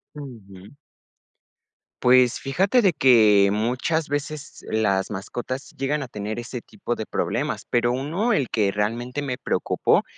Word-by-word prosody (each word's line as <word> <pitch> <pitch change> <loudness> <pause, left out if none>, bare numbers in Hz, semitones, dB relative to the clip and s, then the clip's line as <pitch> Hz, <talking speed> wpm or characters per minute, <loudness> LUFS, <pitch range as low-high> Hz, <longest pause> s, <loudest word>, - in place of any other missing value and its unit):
Ujú. 105 -9 -11 1.3
Pues 125 -1 +5
fíjate 190 - +2
de 190 -5 +3
que 110 -8 +5
muchas 125 +9 0
veces 145 +1 -5
las 100 -3 +1
mascotas 120 +6 -6
llegan 140 +3 -1
a - - -7
tener 105 -1 -5
ese 120 +1 -6
tipo 195 - -5
de 110 - -6
problemas, - - -2
pero 120 0 +2
1, 160 - -1
el 140 - 0
que 105 -3 +1
realmente 115 +6 -2
me 130 -3 -3
preocupó, - - +1
125 Hz, 135 wpm, -23 LUFS, 110-145 Hz, 1.3 s, Pues